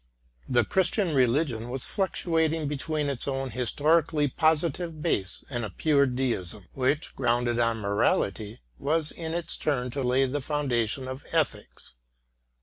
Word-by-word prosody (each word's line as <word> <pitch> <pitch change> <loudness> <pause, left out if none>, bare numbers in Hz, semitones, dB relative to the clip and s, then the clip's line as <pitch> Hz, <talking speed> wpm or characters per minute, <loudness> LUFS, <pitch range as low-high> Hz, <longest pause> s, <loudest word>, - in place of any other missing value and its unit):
The 120 -3 +3
Christian 190 - +1
religion 125 -2 +1
was 130 0 0
fluctuating 165 -5 0
between 150 +1 -2
its 140 -2 -1
own 135 -1 -2
his 125 -2 -1
torically 150 -2 +2
positive 160 +1 +1
base 100 - 0
and 120 -3 -3
a 110 - -3
pure 140 - +3
deism, 115 -7 -2
which, 135 +3 0
grounded 120 -1 +1
on 115 -1 +2
morality, 100 - 0 0.2
was 155 +1 +1
in 165 -1 -5
its 170 -1 -2
turn 125 -4 0
to 140 - -3
lay 130 +1 +3
the 140 +2 -2
foundation 130 -4 -1
of 130 +1 -6
ethics. - - -1
135 Hz, 145 wpm, -27 LUFS, 120-155 Hz, 0.2 s, The